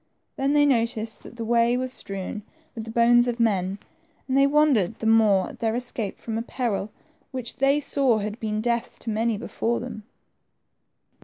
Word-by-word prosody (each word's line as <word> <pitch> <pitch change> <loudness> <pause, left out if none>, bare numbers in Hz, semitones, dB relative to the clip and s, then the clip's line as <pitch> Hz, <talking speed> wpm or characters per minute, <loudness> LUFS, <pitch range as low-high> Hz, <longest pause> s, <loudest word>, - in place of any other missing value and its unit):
Then 275 0 0
they 290 0 +5
noticed 230 -4 0
that - - -12
the 230 -1 -5
way 235 +1 +3
was 255 0 -1
strewn 195 -1 -5 0.3
with 225 -1 -6
the - - -8
bones 240 +1 +4
of 240 0 -2
men, 195 -4 +1 0.5
and 260 - -1
they 275 0 +5
wondered 280 - +3
the 225 - -6
more 215 -4 +4
at - - -12
their 225 -1 0
escape 240 -4 -3
from 225 -1 -4
a - - -2
peril 230 -4 -2 0.4
which 255 -3 -6
they 275 +2 +3
saw 275 -5 +2
had 210 +2 -4
been 215 -2 -2
death 235 0 -1
to 230 - -3
many 225 0 0
before 230 +2 -2
them. 240 -3 -7
230 Hz, 180 wpm, -25 LUFS, 220-250 Hz, 0.5 s, they